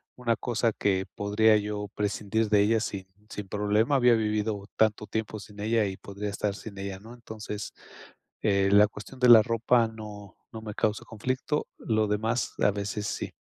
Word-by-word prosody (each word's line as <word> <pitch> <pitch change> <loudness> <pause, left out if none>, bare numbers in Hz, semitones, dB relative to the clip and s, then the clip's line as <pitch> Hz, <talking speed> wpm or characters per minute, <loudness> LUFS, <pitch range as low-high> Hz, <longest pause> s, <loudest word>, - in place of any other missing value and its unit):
una 120 -2 0
cosa 115 0 0
que 95 -2 0
podría 105 +2 +3
yo 105 0 -3
prescindir 105 +1 -1
de 105 - +4
ella 110 +2 +3
sin 95 -3 -4 0.2
sin 105 -2 -6
problema, 105 +7 +1
había 125 -2 +5
vivido 105 -2 -1
tanto 105 -1 +2
tiempo 110 +1 -3
sin 105 0 -13
ella 110 0 +2
y 95 -1 -4
podría 100 +1 -6
estar 100 0 -2
sin 105 -2 -10
ella", 95 -1 -5
¿no? 115 +3 -12
Entonces, 110 -3 -7 0.7
eh, 100 -2 +2
la 105 +1 +7
cuestión 105 +5 -11
de 125 - +4
la 115 -2 +10
ropa 115 0 +2
no 105 -3 -10 0.2
no 110 - -7
me 105 -1 -6
causa 105 0 0
conflicto, 130 +6 -2
lo 110 -1 +1
demás, 110 +4 -1
a 105 - +4
veces 100 +1 -4
sí. - - -4
105 Hz, 180 wpm, -27 LUFS, 105-115 Hz, 0.7 s, la